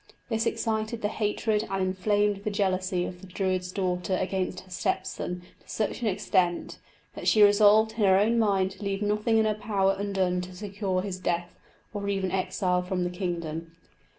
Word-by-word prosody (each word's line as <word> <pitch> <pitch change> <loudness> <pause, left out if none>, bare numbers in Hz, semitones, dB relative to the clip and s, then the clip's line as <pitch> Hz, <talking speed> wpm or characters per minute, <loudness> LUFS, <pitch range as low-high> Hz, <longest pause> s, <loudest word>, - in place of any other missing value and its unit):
This 225 0 0
excited 220 0 -2
the 205 - +2
hatred 215 0 0
and 195 - -1
inflamed 200 +2 +1
the 215 - -1
jealousy 185 -3 0
of 180 -1 -7
the 190 - -11
Druid's 185 -1 -1
daughter 185 -1 -1
against 185 -1 -2
her 185 - -19
step 185 +1 -1
son 180 0 -5 0.2
to - - -24
such 215 +2 -2
an 230 - 0
extent, 185 -3 0 0.3
that - - -6
she 215 - +6
resolved 210 +2 +6
in 220 - -16
her 195 -4 +5
own 225 +4 +3
mind 195 -3 +2
to 195 +2 -11
leave 200 +1 -1
nothing 210 +2 +2
in 220 - +4
her 215 - +2
power 195 -2 +1
undone 190 -3 0
to 180 0 -8
secure 195 -1 -2
his 190 -2 -4
death, 175 -1 -2 0.4
or 200 -1 -3
even 195 -2 -1
exile 185 -1 0
from 180 0 -2
the 175 - -2
kingdom. 170 -3 -4
195 Hz, 185 wpm, -27 LUFS, 185-210 Hz, 0.4 s, she